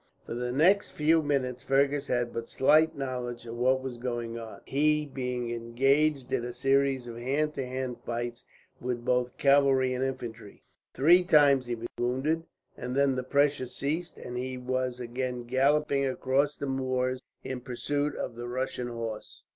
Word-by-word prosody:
For - - -5
the 125 +1 -2
next 180 +10 +3
few 160 +2 +3
minutes 130 -4 -1
Fergus 140 +1 +2
had 120 -1 0
but 115 0 -5
slight 155 +4 +4
knowledge 125 -3 -4
of 115 0 -6
what 130 +2 +2
was 125 -3 -5
going 120 -2 -3
on, 115 -1 -8
he 150 +2 +2
being 125 -3 -3
engaged 135 +4 +1
in - - +1
a 120 0 -5
series 135 0 +2
of 115 -1 -8
hand 145 +5 0
to 135 - -3
hand 130 -1 -3
fights 120 0 -4 0.4
with 120 -1 -3
both 125 -1 0
cavalry 135 -2 +4
and 125 +1 -1
infantry. 115 -5 -6 0.3
Three 175 +6 +6
times 145 -6 +5
he 120 - -1
was 115 +1 -6
wounded, 135 +7 0 0.3
and 125 +1 -5
then 140 -1 +3
the 130 - -1
pressure 140 0 +1
ceased, 155 +8 -3
and 125 0 -6
he 130 0 -4
was 125 0 -2
again 125 0 -3
galloping 140 +3 +2
across 135 +3 0
the - - -4
moors 130 -1 -1 0.2
in 130 -1 -5
pursuit 145 +3 -2
of - - -4
the 120 +1 -6
Russian 125 0 -3
horse. 115 -2 -6
130 Hz, 170 wpm, -29 LUFS, 120-140 Hz, 0.4 s, Three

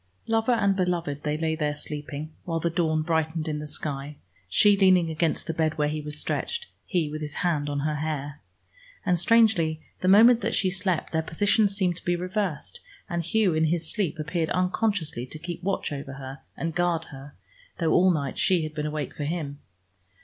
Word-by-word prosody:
Lover 225 +2 +2
and 200 -4 +2
beloved 170 -6 -1
they 150 0 -1
lay 160 0 0
there 150 -2 -1
sleeping, 150 +1 -6
while 165 -2 -2
the 170 +1 0
dawn 160 -2 +1
brightened 160 -1 0
in 150 -1 -2
the 150 - -6
sky, 145 -1 -4 0.3
she 205 - +5
leaning 185 -4 +4
against 160 0 0
the 165 - -2
bed 160 0 0
where 150 -1 +2
he 155 0 -3
was 150 0 -6
stretched, 470 - -2 0.2
he 175 -5 +1
with 155 +1 -5
his 150 -1 -5
hand 150 -4 +1
on 145 -1 -1
her 150 +1 -1
hair. 145 -1 -4 0.6
And 180 -2 +2
strangely, 185 -6 +4 0.2
the 185 - -1
moment 225 +5 +7
that - - 0
she 190 -2 +2
slept, 185 -3 -1
their 160 - +2
positions 200 +5 +2
seemed 180 -4 +1
to - - -7
be 175 - +1
reversed, 180 -2 -3 0.3
and 170 0 0
Hugh 200 +1 +2
in 160 0 +2
his 165 0 0
sleep 195 -7 -1
appeared 165 +1 -1
unconsciously 180 - 0
to 155 - -7
keep 170 +2 -6
watch 190 -2 -1
over 135 -1 -7 0.2
and 165 0 -2
guard 175 -1 +1
her, 135 +1 -11 0.4
though 165 -2 +1
all 185 +1 +5
night 145 -6 -1
she 180 -4 +3
had 155 0 -5
been 150 0 -2
awake 150 0 -4
for 145 - -3
him. 145 -3 -3
160 Hz, 195 wpm, -26 LUFS, 150-180 Hz, 0.6 s, moment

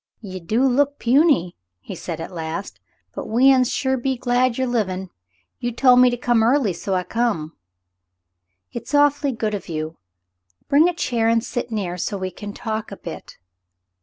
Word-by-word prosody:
"Ye 190 -4 -7
do 215 +9 0
look 280 +2 +2
puny," 255 - +3 0.2
he 105 - -9
said 170 -2 -6
at 165 - -6
last. 165 +2 -5 0.3
"But - - -6
we 250 +5 +5
uns 255 -1 +2
sure 265 -1 0
be 260 +1 -1
glad 245 0 +1
yer 260 - +1
livin'. 190 -7 -2 0.5
Ye 245 - -2
tol' 250 +2 +5
me 250 0 +6
to 245 - -2
come 240 -1 +2
early, 235 -3 +3
so 190 +3 -3
I 180 - 0
come." 200 -6 -2 1.2
"It's 290 - -4
awfully 290 -1 +3
good 220 -3 -2
of 200 -2 -5
you. 155 0 -4 0.7
Bring 305 +5 +5
a 355 - -4
chair 230 -8 0
and 230 0 +2
sit 245 0 -4
near, 195 -6 -3
so 200 +3 -2
we 185 -1 -4
can 205 +1 -8
talk 220 0 -4
a - - -7
bit. - - -9
230 Hz, 180 wpm, -22 LUFS, 190-255 Hz, 1.2 s, me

